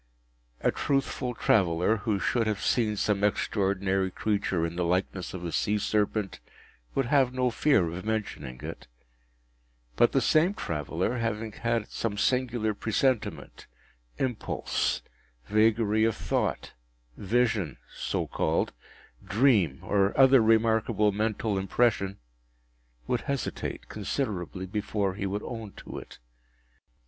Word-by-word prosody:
A - - +3
truthful 135 -3 -1
traveller, 90 0 +2
who 105 -2 -1
should 115 +1 +1
have 105 -2 -1
seen 110 -4 +1
some 100 0 0
extraordinary 95 -2 +1
creature 95 -4 0
in 85 0 -4
the 90 - 0
likeness 90 +1 -1
of 90 -1 -6
a 85 - -3
sea 105 +5 +1
serpent, 105 0 0 0.6
would 135 - +2
have 130 -1 +3
no 125 -1 +1
fear 115 - +3
of 85 +3 -5
mentioning 105 - -4
it; - - -7 1.1
but - - +4
the - - +3
same 170 +6 +3
traveller, 85 - -2
having 115 -1 -2
had 115 0 -1
some 105 -3 -3
singular 120 -2 +1
presentiment, 115 +4 -1 0.5
impulse, 125 -4 -1 0.4
vagary 110 0 +3
of 115 -1 +2
thought, - - -2 0.4
vision 110 - 0 0.2
(so - - -2
called), - - 0 0.5
dream, 100 - +3
or 100 -1 +1
other 135 -1 +7
remarkable 110 -1 +3
mental 105 0 -1
impression, 100 0 +1 0.9
would 125 - 0
hesitate 140 -2 -4
considerably 100 -4 -3
before 100 0 -1
he 100 0 -3
would 100 +2 -3
own 115 -4 -6
to - - -8
it. - - -13
105 Hz, 120 wpm, -28 LUFS, 95-115 Hz, 1.1 s, other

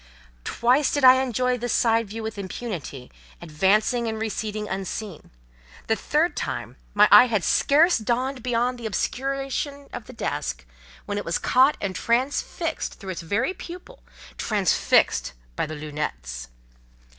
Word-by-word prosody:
Twice 255 +4 +2
did 285 - -1
I 260 0 +8
enjoy 250 0 0
this 240 0 -2
side 230 -2 +2
view 220 +3 -6
with 220 -2 -5
impunity, 185 - -6 0.3
advancing 200 +9 +1
and 220 0 -3
receding 215 -1 -3
unseen; 195 -1 -5 0.6
the 225 - +1
third 310 +8 0
time - - -4 0.2
my 210 +1 +7
eye 210 +5 +9
had 215 -6 0
scarce 310 - +4
dawned 250 +4 -1
beyond 245 +1 0
the 230 - -4
obscuration 275 +5 -3
of 245 -3 -7
the 255 - -10
desk, 65 - -3 0.4
when 205 0 -2
it - - -5
was 165 - 0
caught 265 +4 +3
and 195 -2 -3
transfixed 280 +7 -1
through 190 -2 -6
its 175 - -5
very 215 - -1
pupil—transfixed 345 - -1 0.2
by - - -1
the 155 - -6
"lunettes." 145 - -5
225 Hz, 140 wpm, -24 LUFS, 195-260 Hz, 0.6 s, eye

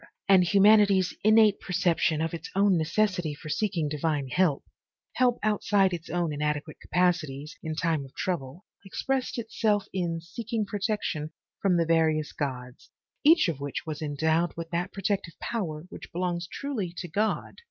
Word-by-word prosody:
and 190 -2 +6
humanity's 200 -1 +5
innate 215 -1 +5
perception 175 -4 +1
of 165 +1 -2
its 170 - -6
own 200 -1 +4
necessity 170 -1 0
for 155 +1 -10
seeking 185 -4 0
divine 150 -1 -1
help, 175 -1 +2 0.5
help 250 -2 +2
outside 205 -2 +2
its 165 -1 -6
own 170 -2 -1
inadequate 150 +1 -2
capacities, 170 -3 0
in 160 -3 -4
time 160 -3 0
of 135 - -14
trouble, 170 0 -4 0.2
expressed 260 +7 -2
itself 220 -2 0
in 170 -3 -1
seek 175 +7 -9
ing 220 -2 +1
protection 200 -7 -2 0.3
from 185 -3 +3
the 170 - +2
various 160 -2 +2
gods, 125 -3 -5 0.3
each 315 - +6
of 160 -5 -2
which 140 -1 -4
was 155 -1 -5
endowed 160 +3 +1
with 165 -1 -6
that 175 +3 -2
protective 195 -3 -2
power 170 -9 -3
which - - -10
belongs 175 -1 -2
truly 245 -11 -3
to 175 - -4
God. 205 +6 -1
175 Hz, 155 wpm, -27 LUFS, 155-200 Hz, 0.5 s, and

